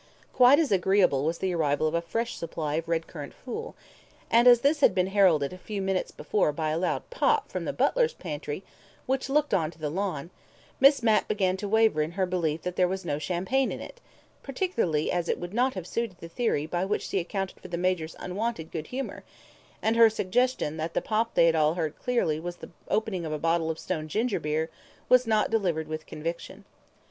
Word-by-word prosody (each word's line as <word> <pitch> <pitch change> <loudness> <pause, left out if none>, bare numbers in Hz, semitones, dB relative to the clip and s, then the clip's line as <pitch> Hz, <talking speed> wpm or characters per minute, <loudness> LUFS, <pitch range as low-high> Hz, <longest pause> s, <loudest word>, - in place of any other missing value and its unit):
Quite 255 +2 +7
as 315 -6 +1
agreeable 190 -7 +3
was 165 +2 0
the 190 -1 -1
arrival 155 -2 +1
of 155 - -2
a 170 - +1
fresh 230 +7 -3
supply 155 -2 -4
of 165 +1 -2
red 165 -1 0
currant 150 -5 -9
fool, 445 - -7 0.6
and 235 +2 +5
as 240 -1 +8
this 290 +2 +2
had - - +4
been 180 -1 +3
heralded 175 -7 +4
a 185 - -10
few 205 +2 -5
minutes 190 -1 -1
before 205 -7 0
by 155 +1 -2
a 155 - 0
loud 180 - -1
pop 455 -3 +1
from - - -3
the - - -1
butler's - - +1
pantry, 150 +1 -5 0.4
which 265 +1 -1
looked 295 +1 +1
on 160 -4 +2
to 165 - -15
the 150 -2 -3
lawn, 175 -3 -3 0.5
Miss 275 -2 +6
Mapp 220 -2 +3
began 190 -3 +1
to 205 - -4
waver 220 -6 +3
in 155 +3 -2
her 190 +1 +1
belief 165 -4 -1
that 180 0 -4
there 180 - +4
was 190 0 -4
no 145 -3 -1
champagne 185 - 0
in - - -5
it, - - -10 0.4
particularly 240 - -1
as 175 -1 -1
it - - +1
would 175 +2 -6
not 255 +3 +1
have 185 -3 -5
suited 225 -1 -3
the 165 - -8
theory 165 -5 -1
by 175 +3 -2
which 195 - -1
she 195 - 0
accounted 195 +2 -4
for - - -10
the 175 -1 -4
Major's 175 -3 -1
unwonted 190 -3 -3
good 160 -2 -5
humour, 265 +1 -5 0.6
and 220 +1 +2
her 230 -1 +7
suggestion 220 -5 0
that 160 +1 -4
the - - +2
pop 225 +1 -1
they 170 - +6
had 165 - +4
all 155 +1 +3
heard 160 -4 -2
so - - -31
clearly 235 -12 +1
was 175 +1 -5
the - - -12 0.2
opening 205 -4 -1
of 160 - -4
a 155 - -1
bottle 165 +1 +1
of 160 - -2
stone 155 -1 -4
ginger 220 +7 0
beer 155 +2 -2 0.4
was 250 -1 +5
not 215 -1 +2
delivered 175 -8 0
with 155 0 -6
conviction. 165 +2 -6
185 Hz, 220 wpm, -27 LUFS, 160-225 Hz, 0.6 s, as